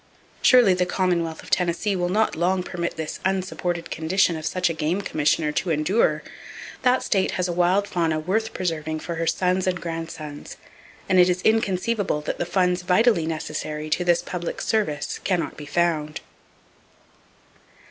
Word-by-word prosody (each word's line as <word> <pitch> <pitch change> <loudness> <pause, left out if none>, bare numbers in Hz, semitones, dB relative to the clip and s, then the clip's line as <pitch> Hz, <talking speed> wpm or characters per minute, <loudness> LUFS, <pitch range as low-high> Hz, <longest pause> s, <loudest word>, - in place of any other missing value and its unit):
Surely 245 -7 +6
the 180 0 0
Commonwealth 175 -3 -1
of - - -13
Tennessee 180 +3 +1
will 175 -1 -1
not 215 +4 +1
long 180 +2 +1
permit 170 -1 -4
this 160 -1 -5
unsupported 180 -2 -2
condition 170 +2 +1
of 155 -1 -4
such 185 0 0
a 165 - -1
game 160 +5 -1
commissioner 155 -3 +1
to 175 - -2
endure. 165 +8 +1 0.6
That 255 0 +3
state 195 -3 +1
has 180 0 -1
a 175 - -2
wild 180 +4 +2
fauna 165 -4 0
worth 210 +8 -1
preserving 155 -3 -3
for 170 - -4
her 165 0 -1
sons 185 +1 +1
and 180 -1 0
grandsons, 165 -3 -6 0.5
and 185 - +4
it 180 0 +6
is 180 0 -1
inconceivable 210 -4 +1
that 150 - -4
the 175 - -1
funds 180 0 +1
vitally 180 -1 +3
necessary 155 -1 -4
to 180 - +1
this 175 -1 +2
public 175 -2 -4
service 155 -10 -1
can 185 -3 +1
not - - -4
be 150 - -9
found. 155 -2 0
175 Hz, 165 wpm, -24 LUFS, 160-185 Hz, 0.6 s, Surely